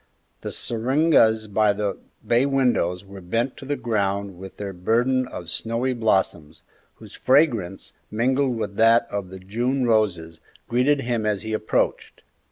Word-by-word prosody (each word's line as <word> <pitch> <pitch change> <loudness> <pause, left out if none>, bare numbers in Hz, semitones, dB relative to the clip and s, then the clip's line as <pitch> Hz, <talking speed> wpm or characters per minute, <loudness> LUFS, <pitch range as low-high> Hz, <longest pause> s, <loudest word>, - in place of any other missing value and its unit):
The - - -5
syringas 120 -2 +2
by 105 0 +2
the 100 -1 -2 0.3
bay 120 +3 +3
windows 120 -10 +1
were 100 0 -11
bent 115 +9 -2
to 135 - -10
the 145 +1 -1
ground 100 -6 -2
with 95 0 -10
their 100 -1 -5
burden 120 +8 +1
of 85 -8 -8
snowy 115 +6 -1
blossoms, 95 -9 -1 0.3
whose - - -14
fragrance, 120 - +1 0.2
mingled 130 +3 0
with 100 -2 -4
that 115 +1 +5
of 100 -3 -4
the 95 - -9
June 120 +8 -1
roses, 90 -8 0 0.3
greeted 135 +4 +2
him 120 -3 -1
as 105 -1 -1
he 110 0 -4
approached. 110 0 -1
110 Hz, 150 wpm, -23 LUFS, 100-125 Hz, 0.3 s, that